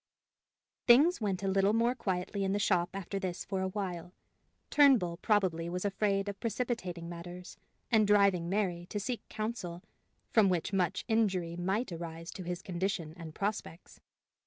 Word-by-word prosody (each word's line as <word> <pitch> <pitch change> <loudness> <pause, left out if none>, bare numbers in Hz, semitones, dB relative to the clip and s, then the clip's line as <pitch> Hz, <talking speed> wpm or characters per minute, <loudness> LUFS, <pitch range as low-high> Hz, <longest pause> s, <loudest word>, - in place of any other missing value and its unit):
Things 280 +6 +6
went 195 -2 -1
a - - 0
little 195 +1 +3
more 235 +2 +3
quietly 195 -3 -2
in 190 0 0
the - - +1
shop 180 -4 +2
after 195 0 -4
this 185 -2 -4
for 190 -1 -2
a 190 - 0
while: 185 -3 -4 0.6
Turnbull 250 -13 +5
probably 180 -5 +1
was 180 +2 -3
afraid 200 0 +1
of 200 -1 -5
precipitating 220 -8 -3
matters, 175 +1 -8 0.3
and 215 -3 +5
driving 200 -4 +4
Mary 180 -3 -1
to 205 - -3
seek 240 +3 -3
counsel 210 -6 -4 0.5
from 215 -4 +5
which 180 +2 -1
much 180 -4 0
injury 190 -7 +1
might 190 +6 -1
arise 165 0 -6
to - - -8
his 175 0 -4
condition 180 -3 -2
and 165 -3 -9
prospects. 200 -4 -4
190 Hz, 160 wpm, -32 LUFS, 175-210 Hz, 0.6 s, Things